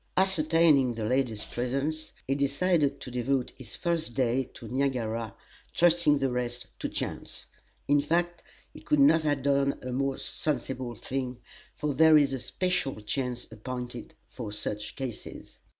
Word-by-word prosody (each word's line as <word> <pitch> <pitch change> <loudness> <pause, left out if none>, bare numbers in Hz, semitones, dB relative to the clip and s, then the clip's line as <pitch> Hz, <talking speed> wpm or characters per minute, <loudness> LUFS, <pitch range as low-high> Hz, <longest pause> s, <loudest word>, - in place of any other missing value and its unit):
Ascertaining 160 -8 +4
the 110 -1 -3
lady's 120 -3 0
presence, 140 +6 -2
he 135 - +1
decided 140 +1 +1
to 125 - -7
devote 125 +1 0
his 120 -3 -10
first 165 -8 -1
day 130 0 +1
to 120 - -9
Niagara, 115 -4 -1 0.4
trusting 170 -3 +4
the 135 -2 0
rest 125 0 -3
to - - -2
chance. - - -5 0.4
In 145 0 +4
fact, 175 +3 0 0.3
he - - -10
could 150 - +1
not 155 +4 +6
have 145 -3 0
done 140 0 +2
a 130 - -4
more 135 +1 0
sensible 130 -5 -3
thing, 130 +2 -4 0.4
for 150 -1 -1
there 160 +2 +7
is 145 -2 +3
a 135 - -2
Special 180 -1 -1
Chance 125 +3 -2
appointed 125 0 -6
for 115 -5 -7
such 105 0 -5
cases. 130 -5 -7
135 Hz, 150 wpm, -29 LUFS, 125-150 Hz, 0.4 s, there